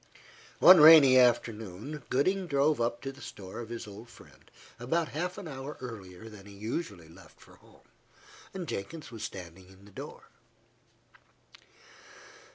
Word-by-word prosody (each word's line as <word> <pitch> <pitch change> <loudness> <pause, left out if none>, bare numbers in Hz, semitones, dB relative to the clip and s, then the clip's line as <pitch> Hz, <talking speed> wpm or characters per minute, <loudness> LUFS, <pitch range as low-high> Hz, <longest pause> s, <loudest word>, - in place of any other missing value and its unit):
One 185 -4 +8
rainy 150 -4 +9
afternoon, 115 +2 0
Gooding 185 +8 0
drove 145 -2 +1
up 120 0 -2
to 135 - -4
the 140 +1 -16
store 95 0 -9
of 115 -2 -8
his 115 -1 -7
old 105 +3 -12
friend, 75 -11 -19 0.3
about 160 +7 -1
half 180 +5 -4
an 200 -4 -8
hour 135 0 -8
earlier 105 -5 -10
than 105 -2 -13
he 100 - -13
usually 100 - -6
left 85 +4 -18
for - - -19
home. - - -23 0.8
Jenkins 145 +3 -7
was 110 -2 -8
standing 90 -3 -9
in 95 +1 -19
the 105 - -17
door. - - -10
120 Hz, 145 wpm, -29 LUFS, 100-150 Hz, 0.8 s, rainy